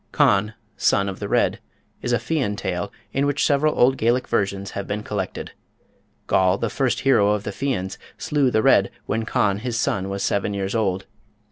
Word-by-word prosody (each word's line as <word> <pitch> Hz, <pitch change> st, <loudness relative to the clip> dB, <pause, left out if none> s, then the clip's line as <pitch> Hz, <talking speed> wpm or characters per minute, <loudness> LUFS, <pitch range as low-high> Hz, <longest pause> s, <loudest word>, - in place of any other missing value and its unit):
Conn, 105 Hz, +2 st, +3 dB, 0.2 s
Son 100 Hz, -, +2 dB
of 95 Hz, -, -5 dB
the -, -, -4 dB
Red -, -, +2 dB, 0.4 s
is 120 Hz, -, -2 dB
a 120 Hz, -, +4 dB
Fian 115 Hz, -2 st, -1 dB
tale 90 Hz, -3 st, -3 dB, 0.2 s
of 135 Hz, -, +1 dB
which 145 Hz, 0 st, +1 dB
several 150 Hz, +2 st, +2 dB
old 130 Hz, +2 st, +4 dB
Gaelic 120 Hz, +3 st, +1 dB
versions 100 Hz, -1 st, -1 dB
have 100 Hz, -, -5 dB
been 105 Hz, +1 st, -3 dB
collected. 100 Hz, -4 st, -4 dB, 0.7 s
Goll, 95 Hz, 0 st, +3 dB
the 115 Hz, +1 st, -2 dB
"first 135 Hz, -3 st, 0 dB
hero" 105 Hz, -7 st, +4 dB
of 105 Hz, -1 st, -2 dB
the 105 Hz, -, -4 dB
Fians, 100 Hz, -5 st, -3 dB, 0.2 s
slew 145 Hz, -3 st, +1 dB
the 110 Hz, -2 st, +1 dB
Red -, -, +5 dB, 0.2 s
when 110 Hz, 0 st, -1 dB
Conn, 100 Hz, -2 st, +1 dB
his 120 Hz, 0 st, -2 dB
son, 95 Hz, -3 st, -1 dB
was 100 Hz, 0 st, -3 dB
seven 100 Hz, 0 st, 0 dB
years 95 Hz, 0 st, -2 dB
old. 95 Hz, -4 st, 0 dB
105 Hz, 190 wpm, -23 LUFS, 100-125 Hz, 0.7 s, Red